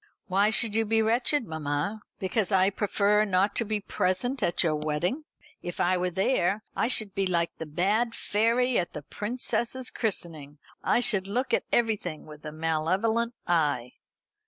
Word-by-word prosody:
"Why 200 +3 +3
should 220 0 +1
you 225 +1 +3
be 225 +1 +2
wretched, 240 +4 +2
mamma, 160 +6 -3 0.2
because 195 +1 -1
I 190 0 +4
prefer 205 +1 +2
not 195 0 +1
to - - +2
be 215 -1 -2
present 225 +7 -1
at 170 - +1
your 160 -3 +1
wedding? 155 - -2 0.4
If 175 - -6
I 185 +1 +3
were 180 0 0
there, 195 +2 +1
I 225 - +1
should 220 -5 +1
be 195 -1 0
like 170 -2 0
the 160 - -5
bad 205 +9 0
fairy 235 +4 +2
at 175 - -3
the 150 - -6
princess's 240 - -3
christening. 160 - -2 0.3
I - - +3
should 205 -6 +2
look 250 +6 -1
at - - +2
everything 210 -9 0
with 150 -1 -12
a - - -5
malevolent 185 +10 0
eye." 145 -8 +1
200 Hz, 165 wpm, -27 LUFS, 170-225 Hz, 0.4 s, I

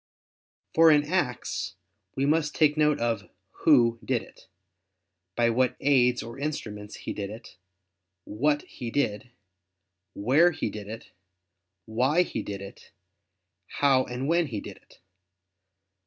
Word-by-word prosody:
For 165 0 +7
in 150 -1 +5
acts 150 - -2 0.4
we 135 - 0
must 150 +1 +1
take 150 -2 +4
note 150 -1 +2
of 115 -3 -2 0.4
"who" 115 -1 +5
did - - 0
it, - - -18 0.9
"by 120 -1 +3
what 125 +1 +1
aids" 125 -3 +3
or 115 +3 -9
"instruments" 105 -8 -5
he - - -3
did 100 -1 -5
it, 110 -3 -11 0.7
"what" 145 +10 0
he 120 - -7
did, 115 -3 -1 0.9
"where" 140 +12 +4
he 160 - -3
did 105 -2 -8
it, 110 +1 -9 0.7
"why" 130 +10 +2
he - - -4
did 100 -1 -6
it, 100 - -12 0.8
"how" 135 -2 +3
and 125 +2 -4
"when" 170 0 +2
he 110 -6 -4
did - - -9
it. - - -23
125 Hz, 135 wpm, -27 LUFS, 115-150 Hz, 0.9 s, For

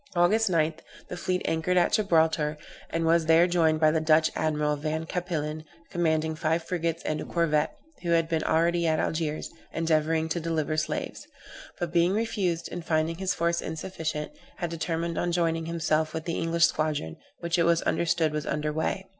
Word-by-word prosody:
August 205 +5 +3
9, 160 -2 +2 0.4
the - - -4
fleet 180 +1 -1
anchored 165 +3 0
at 175 - +3
Gibraltar, 160 -6 +2 0.3
and 165 0 -1
was 165 0 +3
there 165 +1 +6
joined 165 -3 +2
by 155 -1 +5
the 160 0 +1
Dutch 155 0 +4
admiral, 150 -1 0
Van 155 +2 -3
Cappillen, 155 -3 -3 0.3
commanding 160 -2 +1
five 160 +2 0
frigates 165 -1 -2
and 155 - -2
a - - -4
corvette, 155 -3 0 0.2
who 175 - -4
had 165 -1 +3
been 160 -1 0
already 170 +1 +2
at 160 0 +2
Algiers, 155 -1 -2 0.2
endeavoring 160 0 +1
to 170 - -1
deliver 160 -2 -1
slaves: 155 - -3 0.5
but 175 -1 -3
being 175 +2 +3
refused, 200 -6 -1
and 175 - -5
finding 160 0 0
his 190 0 -1
force 170 0 0
insufficient, 160 - -4 0.2
had 175 -2 -4
determined 165 0 -2
on 175 - 0
joining 165 -1 0
himself 160 -1 0
with 160 - -4
the 170 - -2
English 165 0 +3
squadron, 150 - -1 0.3
which 170 0 0
it - - +4
was 170 0 +3
understood 165 -2 +1
was 150 -1 -3
under 150 0 -1
weigh. 160 +5 -2
165 Hz, 180 wpm, -27 LUFS, 155-170 Hz, 0.5 s, there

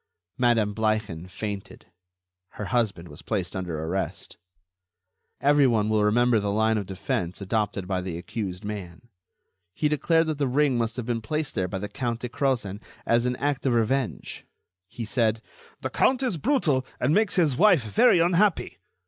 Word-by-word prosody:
Madame 115 -4 +3
Bleichen 110 -6 -1
fainted. 100 +1 -6 0.7
Her 105 - -5
husband 100 -8 0
was 75 -2 -11
placed - - -3
under 90 -4 -3
arrest. 90 +4 -4 1.0
Everyone 130 -7 +3
will 110 -1 +2
remember 120 +2 +3
the 100 0 -2
line 110 +1 +2
of 100 - -6
defense 90 -2 -3
adopted 100 -1 -2
by 95 -1 -1
the 90 -2 -5
accused 95 +1 -5
man. 105 +1 -7 0.7
He 150 - +1
declared 165 +2 +2
that 155 -2 -3
the 140 - +1
ring 140 +1 +2
must 115 -1 -1
have 125 -2 -4
been 120 -1 -2
placed 150 +4 -2
there 95 - -1
by 95 - -4
the 105 +2 -4
Count 115 +2 -3
de 125 - -4
Crozen 115 -6 -1 0.2
as 115 +1 +2
an 125 - 0
act 140 +1 -1
of 125 - +2
revenge. 115 - -1 0.4
He 115 +3 -6
said: 110 0 +1 0.4
"The - - -3
count 260 0 +2
is 240 -10 0
brutal 160 - +1 0.2
and 135 +5 +2
makes 215 +1 +2
his 160 -8 +3
wife 180 - +5
very 110 - +4
unhappy. 175 +3 +2
115 Hz, 165 wpm, -26 LUFS, 100-140 Hz, 1.0 s, wife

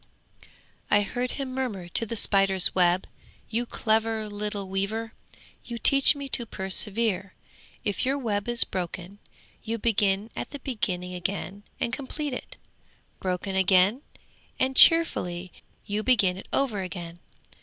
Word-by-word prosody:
'I 205 - +5
heard 245 +5 -2
him 270 -2 -4
murmur 230 -9 -3
to 230 +6 -1
the 230 - -3
spider's 195 -3 +3
web. 180 0 +3 0.5
"You 235 +2 -1
clever 220 -1 0
little 205 -1 -4
weaver! 210 +4 -2 0.5
You 235 - -6
teach 275 +4 +5
me 280 -1 -6
to 235 -2 -1
persevere! 195 0 -1 0.5
If 205 -2 -1
your 270 +2 +1
web 210 -6 -2
is 240 -1 +3
broken, 180 +2 -5 0.4
you 230 +1 -3
begin 210 -1 +1
at - - -4
the 285 - -7
beginning 180 -9 -3
again 190 +2 -4 0.2
and 235 - -1
complete 285 +1 -4
it! - - -7 0.6
Broken 185 +1 -2
again 190 +5 +4 0.6
and 260 0 +1
cheerfully 185 - +5 0.3
you 205 +1 -1
begin 205 -7 +3
it 190 - -10
over 235 -8 0
again. 175 -2 -7
205 Hz, 135 wpm, -26 LUFS, 190-240 Hz, 0.6 s, I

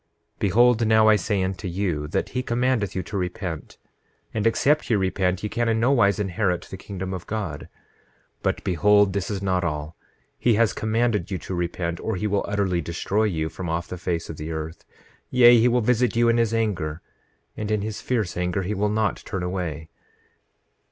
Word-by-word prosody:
9:12 - - -39
Behold, 115 +3 +4
now 110 0 +5
I 110 - +7
say 105 -2 0
unto 95 0 -3
you 85 -5 -2
that 75 - -2
he 125 - -2
commandeth 120 -4 0
you 95 - -1
to 100 - -5
repent; 90 -3 -4 0.6
and 110 0 +1
except 145 +6 +2
ye 115 - +3
repent, 95 -1 0
ye - - 0
can 120 +2 -1
in 110 0 +1
nowise 115 -5 +3
inherit 95 -2 -1
the - - -9
kingdom 95 0 -6
of 90 -2 -6
God. 100 -9 -4 0.7
But - - -1
behold, 100 +3 +4
this 100 -1 -2
is 100 -2 -3
not 95 -2 +1
all—he 80 +8 -3
has 115 0 +3
commanded 110 -4 0
you 95 - -2
to 95 - -7
repent, 85 -1 -2
or 110 - -2
he 95 - -3
will 100 -1 +1
utterly 100 -4 0
destroy 95 +6 -1
you 80 -6 -1
from 90 +2 -6
off 85 +1 -2
the - - -4
face 85 -2 -2
of 80 - -7
the 80 +2 -5
earth; 80 +1 -6 0.4
yea, 120 -1 +7
he 115 - +4
will 125 0 +2
visit 125 +1 +2
you 120 0 +4
in 115 - +3
his 115 -2 +2
anger, 90 -9 -1 0.5
and 105 0 -4
in 105 -2 0
his 110 0 -4
fierce 110 -9 -1
anger 90 +2 -1
he 100 +4 -2
will 105 +1 0
not 110 0 0
turn 95 -2 -5
away. 85 -4 -4
100 Hz, 195 wpm, -24 LUFS, 90-110 Hz, 0.7 s, I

